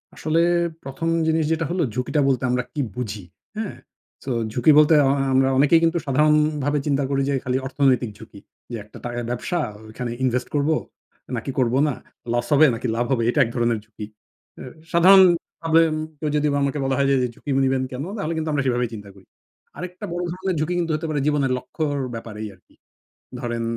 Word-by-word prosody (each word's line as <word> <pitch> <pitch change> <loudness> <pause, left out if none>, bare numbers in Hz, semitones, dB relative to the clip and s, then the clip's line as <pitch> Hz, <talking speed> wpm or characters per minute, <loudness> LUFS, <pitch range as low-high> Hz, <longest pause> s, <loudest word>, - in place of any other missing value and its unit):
আসলে 160 +2 +1 0.4
১ম 135 +5 -4 0.2
জিনিস 160 0 +2
যেটা 160 0 0
হলো, 180 0 +1
ঝুঁকিটা 125 +4 0
বলতে 130 -2 +1
আমরা 125 0 +1
কি 145 - -1
বুঝি? 105 -5 -5 0.3
হ্যাঁ? 215 - -4 0.5
সো 135 - -4 0.2
ঝুঁকি 125 +7 +4
বলতে 150 +1 +6
আ - - +3
আ - - +1
আমরা 130 0 +4
অনেকেই 145 +4 +5
কিন্তু 165 +1 +2
সাধারণভাবে 150 0 +2
চিন্তা 140 -1 +1
করি 135 -1 +1
যে, - - +1
খালি 130 0 0
অর্থনৈতিক 130 -3 +2
ঝুঁকি। 110 -2 -13 0.3
যে - - -3
একটা 105 - -14
টাকার 120 0 -3
ব্যবসা, 125 +8 -2 0.3
ওইখানে 120 +2 -5
ইনভেস্ট 125 0 0
করবো 145 +2 +2 0.6
নাকি 120 +3 -4
করবো 125 0 +2
না, 145 - 0 0.4
লস 120 - 0
হবে 150 +2 +7
নাকি 125 +2 -4
লাভ 120 +1 0
হবে। 115 -3 +1
এটা - - +1
এক 115 - -3
ধরনের 120 -2 +1
ঝুঁকি। 105 -1 -9 0.5
অ্যা - - -9 0.3
সাধারণভাবে 170 -2 +5
উম - - -2 0.2
কেউ 155 - -2
যদি 150 0 +2 0.2
আমাকে 140 +1 -1
যদি - - -1
বলা 135 0 +1
হয় 140 -1 +2
যে - - +4 0.2
ঝুঁকি - - -10 0.2
নিবেন 130 0 +1
কেনো, 135 +5 -5
তাহলে 165 -5 -2
কিন্তু 160 0 -2
আমরা 145 -2 0
সেভাবেই 125 -2 0
চিন্তা 105 -2 -9
করি। 95 -1 -18 0.5
আরেকটা 180 +2 -7
বড় 175 0 -2
ধরণের 185 +1 -2
ঝুঁকি 155 +3 -1
কিন্তু 165 -2 -1
হতে 155 - -4
পারে 150 -2 -1
জীবনের 145 -3 +1
লক্ষ্যর 145 +3 -3 0.2
ব্যাপারেই 110 -1 -6
আরকি। - - -29 0.6
ধরেন 120 -2 -3
140 Hz, 190 wpm, -22 LUFS, 125-155 Hz, 0.6 s, হবে